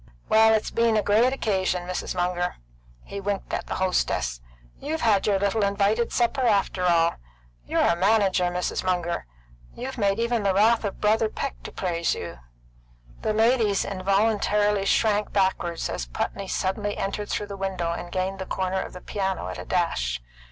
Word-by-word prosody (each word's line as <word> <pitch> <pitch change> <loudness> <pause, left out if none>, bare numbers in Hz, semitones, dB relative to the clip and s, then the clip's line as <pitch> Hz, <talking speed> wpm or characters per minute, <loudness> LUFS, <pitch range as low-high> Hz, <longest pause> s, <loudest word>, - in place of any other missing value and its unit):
Well, 220 0 +6
it's 215 - -1
been 230 -1 +2
a 210 - +2
great 225 +5 +4
occasion, 190 -8 0
Mrs. 185 0 -3
Munger." 180 0 -1 0.5
He 200 - -7
winked 200 0 -3
at - - -2
the - - -3
hostess. 60 - 0 0.4
"You've 315 +2 -3
had 215 -4 +3
your 200 -2 +3
little 200 +2 +1
invited 200 +3 +1
supper, 245 +3 +1
after 200 -5 +1
all. 170 -1 +3 0.5
You're - - +2
a 170 - +3
manager, 195 -1 +3
Mrs. 180 0 -1
Munger. 175 - -1 0.5
You've 260 +1 -6
made 200 -1 +2
even 235 0 0
the 195 -2 +1
wrath 225 +3 +4
of 200 -2 -4
Brother 215 +1 +2
Peck 275 +4 -5
to - - -6
praise 170 -2 -1
you." 85 -7 -7 0.8
The 215 - 0
ladies 220 -2 +3
involuntarily 205 +1 +1
shrank 210 0 +2
backward 190 -4 0
as - - -4
Putney 195 - -3
suddenly 190 +2 -2
entered 200 +1 -3
through 210 - -1
the 200 -1 -7
window 190 -3 -2
and 175 +1 -5
gained 190 +1 -2
the 190 - -5
corner 190 0 -1
of - - -7
the 180 - -9
piano 190 -2 -2
at - - -6
a - - -7
dash. - - 0
195 Hz, 175 wpm, -25 LUFS, 185-215 Hz, 0.8 s, Well